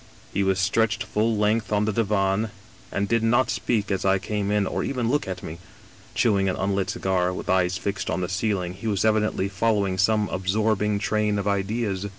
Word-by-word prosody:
He 100 - +1
was 95 -1 +2
stretched 110 +4 +1
full 110 +1 0
length 105 +2 +1
on 105 0 +2
the 110 - 0
divan, 105 0 +1 0.4
and 100 +1 -1
did 115 +1 +2
not 120 +3 +2
speak 105 -4 -1
as 95 - -1
I 95 0 +3
came 100 +1 -2
in, 105 -1 +2
or - - -2
even 125 -3 -1
look 145 -6 0
at 90 -1 -5
me. 80 +2 -7 0.6
Chewing 100 -4 +2
an 90 - -1
unlit 100 -1 -1
cigar, 90 -1 0
with 90 - -3
eyes 90 0 +2
fixed 100 +1 -3
on 85 +3 -1
the 90 - -1
ceiling, 95 -2 -1
he 105 +5 -7
was 100 -3 0
evidently^ 105 -3 +1
following 100 -1 +1
some 105 +2 +3
absorbing 105 +2 0
train 105 0 0
of 100 0 -2
ideas. 100 0 -1
100 Hz, 195 wpm, -24 LUFS, 95-110 Hz, 0.6 s, I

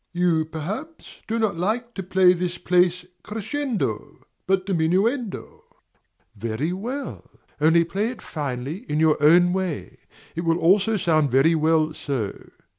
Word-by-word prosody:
You, 175 -3 +2
perhaps, 195 - -7
do 225 - -1
not 220 -6 0
like 230 +7 -1
to 195 - -4
play 185 0 +4
this 175 0 -3
place 180 0 +2 0.2
crescendo, 225 +4 -4 0.2
but 190 0 +1
diminuendo. 195 - -1 0.7
Very 115 - -2
well; 245 +9 -6 0.3
only 165 +2 +5
play 195 +6 -2
it 250 - -8
finely 140 +1 -4
in 150 - 0
your 155 -2 +3
own 175 +4 +5
way; 185 -5 -4 0.4
it 165 - -2
will 165 -1 +1
also 200 +6 +3
sound 155 -5 +2
very 135 +6 +4
well 155 0 +2
so. 130 -10 -4
175 Hz, 135 wpm, -23 LUFS, 160-200 Hz, 0.7 s, only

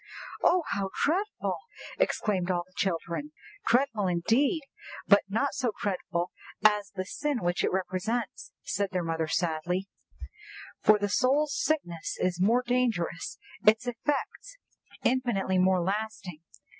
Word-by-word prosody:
"Oh, 360 -1 +4
how 200 -1 -1 0.2
dreadful!" 390 +8 -1 0.4
exclaimed 200 - +1
all 175 -1 +1
the 185 - -28
children. 190 - -2 0.3
"Dreadful 230 -5 +2
indeed, 230 - +2 0.4
but 200 0 +6
not 225 +8 0
so 255 -6 -1
dreadful 180 -3 -2 0.3
as 210 -1 +4
the 185 -1 -2
sin 290 +3 -2
which 175 0 +1
it - - +2
represents," 190 +4 -2
said 200 0 -1
their 180 -2 -1
mother 165 -1 -1
sadly; 175 +3 -1 0.9
"for 215 - +6
the 205 0 -1
soul's 270 +7 +2
sickness 175 - -1
is 180 -1 0
more 235 +6 +4
dangerous, 235 -10 0 0.3
its 220 +3 +5
effects 295 - -3 0.5
infinitely 235 -7 +1
more 185 -1 +3
lasting." 195 -4 -3
205 Hz, 125 wpm, -29 LUFS, 180-250 Hz, 0.9 s, but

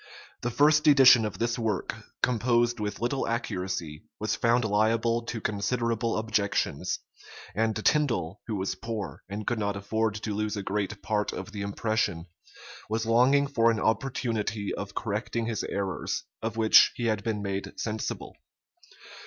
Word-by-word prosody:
The 120 - -1
first 150 +4 +4
edition 130 -5 +8
of 105 - -4
this 120 +1 -1
work, 110 -4 -1 0.3
composed 120 0 +2
with 105 -1 -3
little 125 +3 -1
accuracy, 90 -9 -3 0.2
was 110 0 0
found 120 0 +2
liable 115 +2 +2
to 115 - -4
considerable 115 +2 -1
objections; 110 -2 0 0.6
and 110 +2 +1
Tindal, 110 - +1
who 110 - -2
was 95 -1 -1
poor, 100 -7 -5
and 105 +1 -5
could 120 -2 -1
not 100 -1 -1
afford 110 +2 -1
to 110 -1 -4
lose 105 +1 -2
a 100 - -3
great 100 +1 -3
part 105 -1 0
of - - -6
the 105 -2 -5
impression, 100 -4 -1 0.6
was 110 +1 -1
longing 125 +5 +4
for 115 -5 +3
an 115 -1 +1
opportunity 110 -4 -1
of 100 -1 -6
correcting 115 +1 -2
his 115 -2 -2
errors, 95 -2 -3 0.2
of 115 0 -3
which 110 -1 +6
he 120 - -3
had 110 -3 0
been 105 -3 -2
made 100 0 -4
sensible. 110 -1 -4
110 Hz, 155 wpm, -28 LUFS, 105-115 Hz, 0.6 s, edition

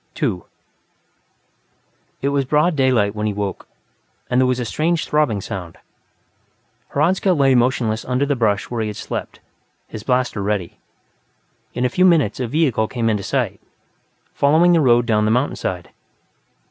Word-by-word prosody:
2 105 - -2 1.8
It 140 - +2
was 140 -1 +1
broad 150 +5 +1
daylight 125 -7 +2
when 105 0 -2
he 105 - -1
woke, 100 -2 -4 0.6
and 125 +1 +3
there 130 - +3
was 125 0 0
a 125 - -2
strange 165 +7 -1
throbbing 150 -9 +1
sound; 90 -3 -7 1.2
Hradzka 180 +6 +2
lay 135 -4 +3
motionless 120 -3 +1
under 125 +2 0
the 145 0 0
brush 105 -4 0
where 120 -2 -2
he 110 - -1
had 105 - -5
slept, - - -6 0.5
his 110 - -8
blaster 125 -3 0
ready. 100 -3 -3 1.0
In 125 - 0
a - - +2
few 185 - +1
minutes, 165 - +3
a 125 - -2
vehicle 130 -5 +1
came 115 -2 -1
into 105 -2 -1
sight, - - -2 0.7
following 160 +5 +4
the 165 - +4
road 120 -3 +4
down 105 -2 +1
the - - +1
mountainside. 110 - -2
125 Hz, 155 wpm, -20 LUFS, 105-145 Hz, 1.8 s, following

